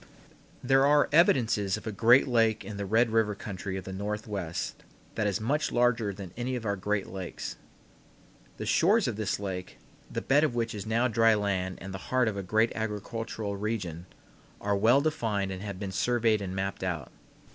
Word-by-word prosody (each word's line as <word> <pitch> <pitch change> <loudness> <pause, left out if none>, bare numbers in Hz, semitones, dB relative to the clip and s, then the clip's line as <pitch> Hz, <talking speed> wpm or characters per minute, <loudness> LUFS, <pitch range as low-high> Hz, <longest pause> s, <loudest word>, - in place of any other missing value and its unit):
There 135 +1 +4
are 145 0 +5
evidences 115 - +3
of 110 - -11
a 110 - -2
great 115 +7 +5
lake 115 -4 +2
in 100 0 -6
the 100 -1 -3
Red 115 +3 +3
River 110 -2 +2
country 95 -1 -5
of 95 - -5
the 95 - -7
Northwest 100 -3 -4 0.3
that 110 -2 0
is 100 -1 0
much 140 +8 0
larger 120 -3 +2
than 95 -2 -9
any 125 +2 -2
of 120 -2 -5
our 100 -1 0
greatest 100 0 -2
lakes. 95 -2 -5 1.0
The - - -5
shores - - +3
of - - -2
this 105 -2 -2
lake 95 -2 -5 0.3
the - - -3
bed 145 +3 +4
of 150 -6 +1
which 115 -1 -1
is 105 0 -6
now 115 +3 +2
dry 115 -1 +4
land 95 -3 -1
and 95 0 -7
the 95 - -5
heart 130 -2 +3
of 110 - -1
a 100 - -3
great 110 +5 +2
agricultural 110 -1 -4
region 95 -6 -3 0.5
are 100 0 0
well 115 +7 +4
defined 110 -11 -1
and 95 0 -6
have 100 -2 -5
been 100 -2 -4
surveyed 115 +1 +2
and 95 -1 -4
mapped 95 0 -3
out. 85 -8 -3
105 Hz, 190 wpm, -29 LUFS, 95-115 Hz, 1.0 s, are